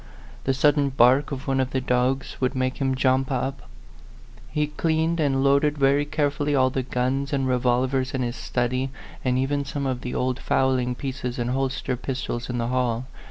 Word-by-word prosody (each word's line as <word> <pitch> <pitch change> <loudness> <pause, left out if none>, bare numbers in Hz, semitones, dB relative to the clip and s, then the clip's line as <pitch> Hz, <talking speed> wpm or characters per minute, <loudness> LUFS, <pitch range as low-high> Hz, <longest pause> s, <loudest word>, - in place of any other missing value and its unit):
The 135 - +1
sudden 145 +1 +3
bark 130 +3 +4
of 135 0 -5
one 135 0 +1
of 130 -1 +1
the 130 - -1
dogs 130 +1 0
would 130 0 +1
make 130 0 -1
him 135 -1 0
jump 130 0 +2
up. 135 +1 -3 0.8
He 150 -1 0
cleaned 160 +2 0
and 135 -3 +2
loaded 140 +2 +3
very 140 +1 +3
carefully 145 -1 0
all 130 -1 +3
the 130 - -1
guns 130 +2 -1
and 135 -2 0
re 125 -1 +2
volvers 130 +2 +1
in 130 - 0
his 120 0 -3
study, 125 +2 -1 0.3
and 125 -1 +1
even 140 +2 0
some 140 0 -4
of 130 -2 -2
the 125 - -4
old 130 0 0
fowling 130 -2 +1
pieces 130 -2 -4
and 120 0 -1
holster 135 -1 -1
pistols 125 -1 -4
in 125 - -2
the 120 0 -1
hall. 125 -1 0
130 Hz, 190 wpm, -24 LUFS, 125-140 Hz, 0.8 s, bark